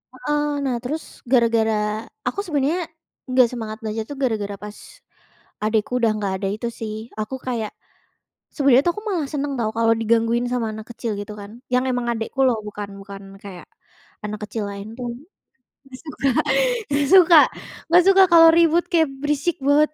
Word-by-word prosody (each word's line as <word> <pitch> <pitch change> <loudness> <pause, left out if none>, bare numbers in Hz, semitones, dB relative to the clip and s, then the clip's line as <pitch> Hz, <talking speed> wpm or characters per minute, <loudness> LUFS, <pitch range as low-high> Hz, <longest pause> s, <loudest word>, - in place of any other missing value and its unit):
heeh, 295 +4 -1 0.2
nah, 260 -3 0
terus 300 +6 -3 0.3
gara-gara 230 -3 +3 0.5
aku - - -2
sebenarnya 320 0 -1 0.4
nggak 255 -1 +5
semangat 220 -3 -5
belajar 220 0 -3
tuh 290 - -7
gara-gara, 210 -5 -1
pas 210 0 -8 0.9
adekku 215 +2 0
udah 230 -2 +3
nggak 200 -2 -2
ada, - - +1
itu 235 +2 -4
sih. 215 -1 -4 0.2
Aku 215 +5 -3
kayak 230 -4 -2 0.8
sebenarnya 275 -3 +5
tuh 345 - +3
aku 420 - -6
malah 335 -8 -1
seneng 285 -1 -2
tau 220 -2 0
kalau 225 0 +4
digangguin 230 +2 +1
sama 230 -3 -1
anak 215 0 -8
kecil 230 0 -4
gitu 205 +1 -8
kan. 200 +1 -10 0.2
Yang 250 0 +3
emang 245 -1 -2
adekku 225 +4 -6
loh, 240 -3 +2
bukan 205 -1 -6
bukan 195 0 -10 0.2
kayak 190 -3 -10 0.6
anak 210 0 -5
kecil 215 +1 -4
lain 200 +2 -8
dong. 240 -2 -5 0.7
Nggak 260 -1 -11
suka 295 -3 -2 0.6
nggak 285 0 +1
suka 350 -3 +8 0.5
nggak 350 +1 +7
suka 385 - +7
kalau 330 -1 +9
ribut 335 0 +4
kayak 325 -3 +3
berisik 295 +3 0
banget 295 +2 +4
240 Hz, 165 wpm, -22 LUFS, 215-290 Hz, 0.9 s, kalau